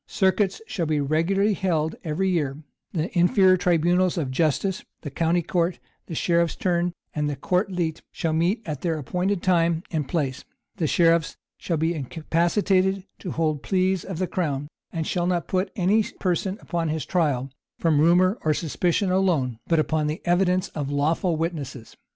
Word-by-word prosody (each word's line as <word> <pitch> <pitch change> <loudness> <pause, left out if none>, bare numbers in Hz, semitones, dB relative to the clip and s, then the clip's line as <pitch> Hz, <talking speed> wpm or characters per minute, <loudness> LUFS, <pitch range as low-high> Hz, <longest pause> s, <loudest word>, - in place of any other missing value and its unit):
Circuits 190 +1 +1
shall 170 -7 -2
be 155 -1 +1
regularly 170 +9 +2
held 165 -5 0
every 165 +4 -1
year: 150 -7 0 0.3
the 165 +1 -3
inferior 185 +1 +5
tribunals 180 +1 +2
of 140 -6 -1
justice, 165 +6 0 0.2
the 145 - -6
county 165 +4 +1
court, 170 +1 0 0.3
sheriff's 170 +1 +1
turn, 175 -1 0 0.2
and 150 -2 -2
court 185 +2 0
leet 170 -3 -2
shall 160 -1 -2
meet 175 +8 +1
at 150 -5 -4
their 165 -3 0
appointed 180 +6 -1
time 170 -2 +2
and 155 -5 -1
place: 140 -5 -2 0.3
the 160 - 0
sheriffs 165 0 +3 0.2
shall 170 - -1
be 160 +2 +1
incapacitated 180 - +1 0.2
to 185 - -6
hold 155 -3 -1
pleas 185 0 +1
of 190 - -6
the 185 - 0
crown; 145 -6 -2 0.2
and 165 -2 -3
shall 175 +1 0
not 175 -2 0
put 185 +1 0
any 200 +3 +3 0.2
person 185 +1 -1
upon 170 -2 -2
his 155 -2 -2
trial, 140 -7 0 0.3
from 155 -3 +2
rumor 180 +5 +4
or 155 -1 +2
suspicion 175 +4 0
alone, 160 -11 +1
but 165 - +2
upon 155 0 +1
the 155 +1 -4
evidence 180 +1 +2
of 145 -3 -4
lawful 155 +4 +1
witnesses. 145 -8 -4
170 Hz, 160 wpm, -24 LUFS, 155-185 Hz, 0.3 s, inferior